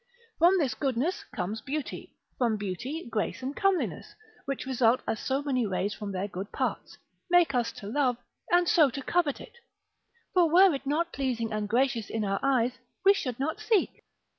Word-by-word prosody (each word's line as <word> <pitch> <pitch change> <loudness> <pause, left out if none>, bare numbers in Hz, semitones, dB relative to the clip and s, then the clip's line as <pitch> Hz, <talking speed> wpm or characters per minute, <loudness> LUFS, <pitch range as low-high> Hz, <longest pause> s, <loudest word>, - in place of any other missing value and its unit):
From 350 +4 +6
this 280 -9 +1
goodness 270 +8 -1
comes 205 +3 -4
beauty; 290 0 -5 0.2
from 235 -4 +2
beauty, 240 - -5
grace, 225 +3 -2
and 270 +3 -3
comeliness, 390 -2 0 0.3
which 275 -2 -3
result 250 -2 +2
as 220 - -1
so 270 +2 -1
many 260 -4 0
rays 195 +1 -1
from 205 0 -6
their 190 +1 -2
good 195 +1 -7
parts, - - -3 0.3
make 345 -5 +4
us 240 -2 +1
to - - -10
love, 250 +1 +1 0.3
and 350 0 +4
so 310 -5 +5
to 275 +2 -6
covet 330 -4 +1
it: 475 - -13 0.8
for 355 -3 +4
were 365 +2 +6
it 275 0 -5
not 330 +4 0
pleasing 235 -5 -2
and 210 -1 -2
gracious 240 -1 +1
in 220 -1 -2
our 195 0 0
eyes, 250 -2 +1 0.3
we 395 - +8
should 255 - -4
not 315 +8 -2
seek. 435 -2 0
265 Hz, 180 wpm, -28 LUFS, 225-315 Hz, 0.8 s, we